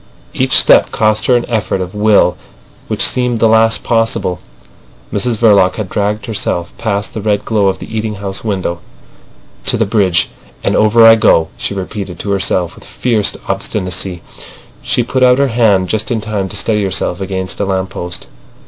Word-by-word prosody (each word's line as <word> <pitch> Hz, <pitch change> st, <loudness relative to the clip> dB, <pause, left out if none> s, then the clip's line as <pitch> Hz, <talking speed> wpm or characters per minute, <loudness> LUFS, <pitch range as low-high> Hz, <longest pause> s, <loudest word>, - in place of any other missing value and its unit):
Each -, -, 0 dB
step -, -, +5 dB
cost 110 Hz, 0 st, +1 dB
her 125 Hz, -, +4 dB
an 120 Hz, -, +1 dB
effort 110 Hz, -4 st, -1 dB
of 90 Hz, -1 st, -5 dB
will 105 Hz, -4 st, +3 dB, 0.5 s
which -, -, +1 dB
seemed 125 Hz, -2 st, 0 dB
the 115 Hz, -, +4 dB
last 110 Hz, 0 st, +3 dB
possible. 115 Hz, -6 st, 0 dB, 0.7 s
Mrs 120 Hz, -3 st, 0 dB
Verloc 100 Hz, -5 st, +4 dB
had 105 Hz, -4 st, -5 dB
dragged 105 Hz, 0 st, -1 dB
herself 95 Hz, -6 st, -3 dB
past 100 Hz, -2 st, -2 dB
the 110 Hz, -, -5 dB
red 105 Hz, -1 st, -1 dB
glow 105 Hz, -3 st, +1 dB
of 95 Hz, -1 st, 0 dB
the 110 Hz, -, -9 dB
eating 110 Hz, -1 st, -2 dB
house 95 Hz, -1 st, -5 dB
window. 95 Hz, -5 st, -2 dB, 0.9 s
"To -, -, +4 dB
the 110 Hz, -, +1 dB
bridge—and 100 Hz, -4 st, -1 dB
over 110 Hz, +2 st, +5 dB
I 115 Hz, -, +9 dB
go," 105 Hz, -7 st, +3 dB
she 100 Hz, -, -4 dB
repeated 95 Hz, -1 st, -5 dB
to 100 Hz, -, -4 dB
herself 95 Hz, -3 st, 0 dB
with -, -, -16 dB
fierce 110 Hz, -5 st, 0 dB
obstinacy. 90 Hz, -1 st, -3 dB, 0.6 s
She 120 Hz, -, 0 dB
put 130 Hz, +2 st, -2 dB
out 125 Hz, 0 st, +5 dB
her 140 Hz, 0 st, +2 dB
hand 110 Hz, -6 st, +2 dB
just 110 Hz, +2 st, -2 dB
in 120 Hz, -, -1 dB
time 105 Hz, -3 st, -3 dB
to -, -, -6 dB
steady 105 Hz, -2 st, 0 dB
herself 95 Hz, -1 st, -2 dB
against 95 Hz, -1 st, -4 dB
a 100 Hz, -, 0 dB
lamp 95 Hz, -1 st, -2 dB
post. 90 Hz, -1 st, -6 dB
105 Hz, 175 wpm, -14 LUFS, 95-110 Hz, 0.9 s, I